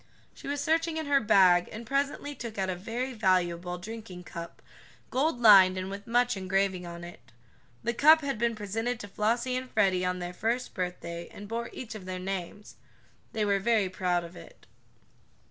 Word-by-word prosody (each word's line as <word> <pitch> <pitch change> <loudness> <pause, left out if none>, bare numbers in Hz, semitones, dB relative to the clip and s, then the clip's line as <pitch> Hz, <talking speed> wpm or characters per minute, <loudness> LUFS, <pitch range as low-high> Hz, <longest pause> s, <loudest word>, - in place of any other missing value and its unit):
She - - -11
was 285 +1 -2
searching 325 +2 +1
in 315 - -2
her 285 -1 +4
bag, 180 -4 +5
and 225 +2 -7
presently 280 +3 -1
took 235 -6 -7
out 190 -1 0
a - - -3
very 235 +8 -4
valuable 180 -4 +1
drinking 195 -1 -8
cup, 170 -1 -8 0.5
gold 265 0 +1
lined 195 -5 +8
and 185 +1 -4
with 200 +1 -8
much 245 +1 +2
engraving 190 -1 -1
on 170 0 -8
it. 175 0 -12 0.5
The 235 - 0
cup 310 +6 +6
had 275 -5 -3
been 235 0 +1
presented 225 +3 -3
to 205 - -7
Flossie 235 +5 0
and 255 0 -4
Freddie 190 -5 +2
on 180 0 0
their 175 0 -5
first 235 +6 -2
birthday, 170 -2 -5
and 205 - -10
bore 230 +2 -3
each 235 -3 -7
of 210 -4 -9
their 185 0 -4
names. 190 +2 -6 0.6
They 215 -1 0
were 200 -1 +2
very 210 -2 +2
proud 180 -2 0
of 170 +1 -10
it. - - -14
205 Hz, 185 wpm, -29 LUFS, 185-240 Hz, 0.6 s, lined